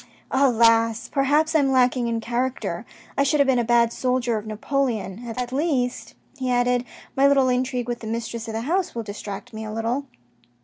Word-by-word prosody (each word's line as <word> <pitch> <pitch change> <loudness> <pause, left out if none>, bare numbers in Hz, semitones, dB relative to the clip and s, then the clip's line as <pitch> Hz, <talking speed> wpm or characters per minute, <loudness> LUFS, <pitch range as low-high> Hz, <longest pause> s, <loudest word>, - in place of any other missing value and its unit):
" - - -34 0.2
Alas! 230 -1 +3
perhaps 295 +3 +2
I 315 - +5
am 275 -2 +2
lacking 250 -1 +3
in 230 -1 -1
character. 245 +3 -2 0.3
I - - +2
should 280 +2 +2
have 280 - +5
been 265 -2 +3
a - - +2
bad 235 0 +3
soldier 250 -2 0
of 215 0 -4
Napoleon. 220 -3 -2
At 250 -1 -3
least," 265 -4 -1 0.2
he 255 -1 -1
added, 245 0 +2
" - - -22
my 275 +1 +5
little 275 -2 +4
intrigue 250 -1 -1
with 240 -1 -3
the 225 - -8
mistress 230 0 -4
of 220 - -5
the 225 - -1
house 345 +7 -1
will 230 - -3
distract 205 0 -7
me 220 0 -6
a 215 - -6
little." 230 +6 -2
245 Hz, 205 wpm, -23 LUFS, 230-265 Hz, 0.3 s, I